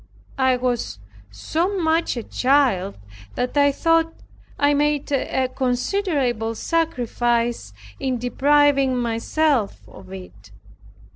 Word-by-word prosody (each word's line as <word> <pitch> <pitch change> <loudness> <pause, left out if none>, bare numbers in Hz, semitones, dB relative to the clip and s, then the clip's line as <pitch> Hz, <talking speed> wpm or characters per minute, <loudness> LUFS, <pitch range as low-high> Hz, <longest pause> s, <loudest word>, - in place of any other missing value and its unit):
I 260 -1 +3
was 245 - -2 0.3
so 330 - -2
much 325 -5 +1
a 235 - -3
child, 250 -9 +1 0.4
that 250 +2 -2
I 285 0 +4
thought 330 +3 +2 0.5
I 285 0 +3
made 290 0 0
a 265 -1 0
considerable 255 - -1
sacrifice 240 - -1 0.3
in 260 -2 -1
depriving 275 +1 +2
myself 235 - 0
of 100 -3 -14
it. 95 +1 -11
255 Hz, 100 wpm, -22 LUFS, 230-290 Hz, 0.5 s, I